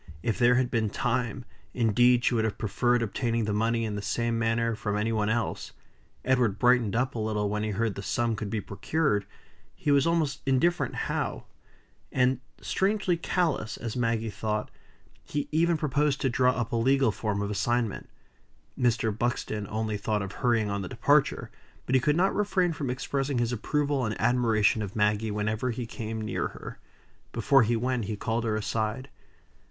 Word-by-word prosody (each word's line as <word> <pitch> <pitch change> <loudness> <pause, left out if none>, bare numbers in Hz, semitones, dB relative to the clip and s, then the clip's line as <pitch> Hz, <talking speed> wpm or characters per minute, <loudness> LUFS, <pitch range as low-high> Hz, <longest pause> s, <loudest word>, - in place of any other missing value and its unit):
If 115 0 -1
there 120 0 +5
had 125 -1 +1
been 110 -3 +1
time, 125 +2 -2 0.3
indeed, 120 +1 +4
she - - +3
would 115 -2 +2
have 110 -1 -2
preferred 120 +3 +1
obtaining 115 +1 -1
the 105 - -1
money 115 +2 +1
in 110 - -3
the 100 - -3
same 115 +3 -1
manner 115 +1 +1
from 105 -1 -2
any 110 +2 0
one 105 -2 0
else. 115 +1 -2 0.5
Edward 125 -6 +2
brightened 120 -4 +3
up 125 +2 0
a 115 - -4
little 105 -1 -1
when 105 0 -1
he 110 - -1
heard 110 +1 0
the 100 - -6
sum 115 +3 0
could 105 -1 -4
be 105 0 -2
procured; 105 -1 -1 0.5
he 145 - -1
was 140 +1 +4
almost 155 -4 0
indifferent 155 +7 +2
how; - - -2 0.7
and, 130 0 +2 0.2
strangely 190 -2 +1
callous, 170 - -1
as 115 -1 -5
Maggie 115 -2 0
thought, 105 +1 -3 0.5
he 145 -1 -3
even 165 +2 +2
proposed 150 -1 +1
to 135 - +1
draw 125 0 +3
up 120 -3 -3
a 115 - 0
legal 130 +1 +3
form 105 +1 -2
of 100 - -3
assignment. 115 +2 -1 0.7
Mr. 115 -3 +1
Buxton 110 -3 -2
only 110 0 -2
thought 105 0 -1
of 95 - -6
hurrying 115 -3 +1
on 100 0 -2
the 95 - -5
departure; - - +2 0.3
but 130 - -2
he 130 - +5
could 150 +2 +2
not 190 +2 +3
refrain 185 -4 +1
from 145 -4 -4
expressing 135 +1 -2
his 120 0 +1
approval 140 +3 0
and 110 -2 -2
admiration 110 -4 +2
of 100 -2 -5
Maggie 105 +1 +1
whenever 105 +4 -1
he 120 0 -3
came 110 0 -5
near 110 - -2
her. - - -10 0.5
Before 135 -2 +4
he 115 +1 +2
went, 125 0 -1
he 105 +1 -3
called 115 +2 -1
her 110 -1 0
aside. 110 +4 -2
115 Hz, 180 wpm, -28 LUFS, 110-130 Hz, 0.7 s, there